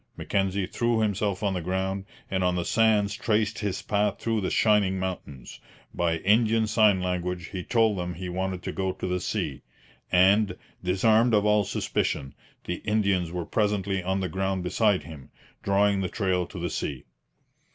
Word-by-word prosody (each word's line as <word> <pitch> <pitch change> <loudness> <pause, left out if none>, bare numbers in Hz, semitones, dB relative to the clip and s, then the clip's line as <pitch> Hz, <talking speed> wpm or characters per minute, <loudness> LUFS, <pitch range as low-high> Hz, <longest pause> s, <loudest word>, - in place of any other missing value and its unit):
Mackenzie 95 0 0
threw 115 +3 0
himself 105 -2 -1
on 100 -2 +1
the 90 - -2
ground, 95 +2 -2 0.3
and 95 -1 0
on 90 0 +2
the 90 -1 -2
sands 110 -3 +3
traced 110 -1 0
his 100 -3 -3
path 105 -1 0
through 115 -2 -1
the 95 - -1
'shining 105 -3 +3
mountains.' 90 -9 -6 0.3
By 85 -1 0
Indian 110 +4 +3
sign 105 -3 +3
language 90 -1 -3
he 95 -2 -5
told 110 -4 +2
them 90 0 -4
he 90 +2 -6
wanted 95 0 -3
to - - -3
go 95 -1 -2
to - - -6
the 90 0 -1
sea; - - -3 0.5
and, 95 +2 +4 0.3
disarmed 110 +5 +3
of 105 0 +2
all 105 -1 +3
suspicion, 70 -6 -2 0.3
the 90 - -3
Indians 100 -5 0
were 90 -1 -3
presently 100 -2 0
on 95 +2 -1
the 95 - -1
ground 95 0 -2
beside 100 +2 +2
him, 75 -5 -11 0.3
drawing 100 0 +2
the 90 - -2
trail 95 -4 0
to - - -10
the 85 0 -3
sea. 70 -3 -4
95 Hz, 170 wpm, -26 LUFS, 90-105 Hz, 0.5 s, and